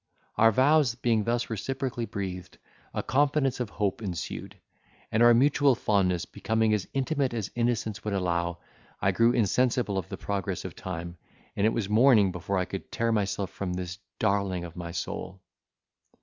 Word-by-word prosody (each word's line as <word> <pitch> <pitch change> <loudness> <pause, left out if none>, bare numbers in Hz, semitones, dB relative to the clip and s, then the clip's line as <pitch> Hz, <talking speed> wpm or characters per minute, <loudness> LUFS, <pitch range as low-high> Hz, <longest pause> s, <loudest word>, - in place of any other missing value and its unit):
Our 115 0 +5
vows 135 +1 +4
being 115 -3 +1
thus 120 0 0
reciprocally 125 +1 -3
breathed, 90 -3 -5 0.3
a - - -3
confidence 135 -1 +1
of 120 -4 -2
hope 100 +1 -2
ensued, 90 -6 -5 0.5
and 110 - +2
our 120 0 +7
mutual 140 +1 +4
fondness 90 -6 +1
becoming 110 -1 0
as 105 -3 -1
intimate 135 -2 0
as 105 -4 -3
innocence 115 -3 -1
would 105 -2 -2
allow, 85 -2 -1 0.4
I 95 - +2
grew 115 +5 +4
insensible 120 -2 +1
of 90 - -7
the - - -5
progress 100 -2 -3
of - - -6
time, 85 -1 -6 0.4
and 100 - +2
it - - +2
was 110 -4 -1
morning 110 -2 +5
before 90 +3 -3
I 90 - +1
could 95 - -7
tear 115 0 0
myself 100 -3 -1
from 90 -2 -4
this 90 +2 -5 0.2
darling 100 -4 0
of 85 -1 -8
my 85 -1 -6
soul! 90 +2 -5
105 Hz, 165 wpm, -28 LUFS, 95-120 Hz, 0.5 s, our